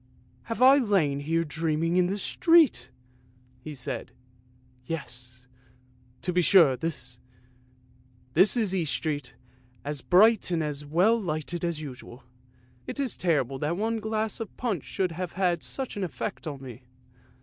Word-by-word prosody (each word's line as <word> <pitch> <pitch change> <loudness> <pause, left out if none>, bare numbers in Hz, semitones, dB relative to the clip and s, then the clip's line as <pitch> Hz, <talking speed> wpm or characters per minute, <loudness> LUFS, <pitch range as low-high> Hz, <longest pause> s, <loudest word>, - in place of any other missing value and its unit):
Have 230 +2 -1
I 270 +2 +8
lain 185 - +1
here 165 +3 0
dreaming 165 +1 -1
in 180 -1 +3
the 195 +3 -2
street! 300 - +3 0.4
" 125 0 -32
he 155 -1 -7
said. 125 - -4 0.4
" 125 - -32 0.3
Yes, 125 -5 -7 0.8
to 180 - -1
be 180 - +3
sure, 170 -6 +6
this 125 -5 -6 1.1
is 200 - +3
East 160 -7 0
Street, 145 -5 -3 0.5
as 145 -1 -4
bright 215 +4 +4
and 170 -3 0 0.3
well 205 +9 +3
lighted 165 -1 -3
as 170 -3 -2
usual. 125 -2 -10 0.6
It - - -5
is 270 -3 -1
terrible 140 -7 0
that 155 +5 -1
one 225 +2 -1
glass 220 0 -2
of 225 -3 -7
punch 215 - -2
should 185 -2 -2
have 175 +1 -5
had 180 -2 0
such 265 -2 -4
an 200 - -3
effect 185 0 -5
on 140 -3 -6
me." 125 -1 -10
165 Hz, 150 wpm, -27 LUFS, 140-200 Hz, 1.1 s, I